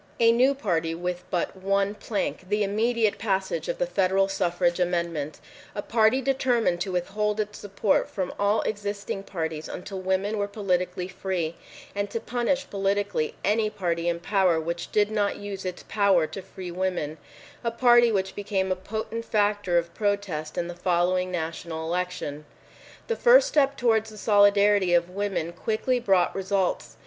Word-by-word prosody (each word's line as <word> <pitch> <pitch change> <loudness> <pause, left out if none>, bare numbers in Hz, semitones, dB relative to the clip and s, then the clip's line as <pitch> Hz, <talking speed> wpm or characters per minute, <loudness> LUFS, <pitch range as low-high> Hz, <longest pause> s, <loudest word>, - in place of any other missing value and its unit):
A 230 0 +6
new 255 +4 +4
party 165 - -1
with 180 +1 -3
but 175 +1 -1
one 195 +1 0
plank—the 210 -1 -2
immediate 220 +2 +1
passage 190 -6 -1
of 170 - -1
the - - +1
federal 190 +2 +2
suffrage 175 -2 0
amendment—a 170 +1 -3
party 225 +3 +3
determined 245 -9 +1
to 190 - -2
withhold 210 +4 -1
its 210 0 -3
support 200 0 0
from 185 -2 -3
all 205 +2 +2
existing 205 -1 -3
parties 160 -5 -4
until 190 +1 -6
women 190 +3 0
were 200 - 0
politically 180 -3 -1
free, 180 -3 -3 0.4
and 200 0 -2
to 230 - -3
punish 250 +4 -1
politically 200 -4 -1
any 215 +1 +2
party 170 -4 -1
in 170 0 -1
power 185 -3 +2
which 170 +2 -4
did 210 0 +2
not 205 -2 +1
use 200 -2 -6
its 180 -1 -5
power 200 -6 +3
to 195 - -7
free 185 -1 -8
women; 175 -4 -2 0.4
a 235 - +1
party 240 0 +5
which 190 -2 -1
became 195 -2 -1
a - - +2
potent 220 +4 -5
factor 205 -4 +1
of 170 0 -1
protest 200 -7 -2
in 170 - -1
the 175 - -5
following 180 +1 +1
national 165 -1 -4
election. 170 -4 -3 0.6
This 460 - -2
first - - +7
step 280 -2 +2
towards 225 -2 +2
the 215 - -12
solidarity 205 -3 +4
of 170 +1 +1
women 190 -4 -2
quickly 230 +6 0
brought 195 -6 +2
results. 195 -1 -1
195 Hz, 155 wpm, -26 LUFS, 175-210 Hz, 0.6 s, first